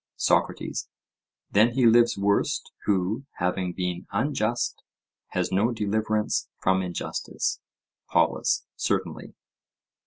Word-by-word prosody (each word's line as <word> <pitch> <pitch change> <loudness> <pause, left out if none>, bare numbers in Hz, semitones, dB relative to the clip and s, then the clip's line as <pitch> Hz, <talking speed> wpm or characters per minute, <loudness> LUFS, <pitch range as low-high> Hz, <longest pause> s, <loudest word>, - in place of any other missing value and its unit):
SOCRATES: - - 0 0.6
Then 110 +4 +4
he 130 -2 +3
lives 120 0 +5
worst, 100 +1 +1
who, 100 +6 0
having 90 0 0
been 90 -1 -3
unjust, 120 0 0 0.5
has - - -2
no 105 +6 +2
deliverance 110 -1 0
from 95 0 +2
injustice? 90 -2 -3 0.5
POLUS: - - +2
Certainly. - - -2
105 Hz, 95 wpm, -26 LUFS, 95-115 Hz, 0.6 s, lives